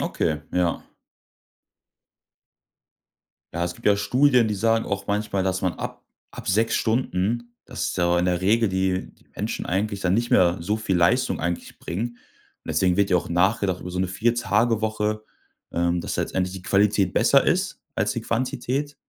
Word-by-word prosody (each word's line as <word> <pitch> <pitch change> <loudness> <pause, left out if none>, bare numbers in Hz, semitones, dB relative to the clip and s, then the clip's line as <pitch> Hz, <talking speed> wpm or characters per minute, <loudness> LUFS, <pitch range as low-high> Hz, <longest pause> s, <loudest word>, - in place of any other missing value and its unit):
Okay, 75 -1 -1
ja. 90 -2 0 2.7
Ja, 85 +1 -1
es 85 0 -4
gibt - - -9
ja 100 -1 +5
Studien, 125 +4 +3
die 105 - -1
sagen 115 +2 +1
auch 100 0 -3
manchmal, 100 -1 0
dass 95 0 -1
man 90 -2 +1
ab - - -7 0.3
ab - - -8
6 110 +4 +2
Stunden 115 0 0 0.2
dass - - -3
da 85 0 +2
in 90 - +1
der 90 -1 +1
Regel 110 +4 +3
die 95 0 -1
die - - -28
Menschen - - -3
eigentlich 100 +2 -1
dann 95 -1 +1
nicht 120 +2 0
mehr 90 -1 +4
so 105 +5 -1
viel 110 -4 -1
Leistung 85 0 +2
eigentlich 85 0 -4
bringen. 120 +7 -4 0.5
Deswegen 90 +3 +1
wird 100 -1 +2
ja 90 - +5
auch 85 - -2
nachgedacht 95 +1 +1
über 90 - -7
so 90 - -3
'ne 95 - +1
4- 115 +6 +1
Tage-Woche, 110 -2 0 0.5
ähm, 85 0 +1
dass - - -4
da - - 0
letztendlich 95 0 -2
die 95 - -8
Qualität 100 -1 +2
besser - - +4
ist - - 0
als - - 0
die - - -3
Quantität. 130 +4 -2
100 Hz, 175 wpm, -24 LUFS, 90-110 Hz, 2.7 s, ja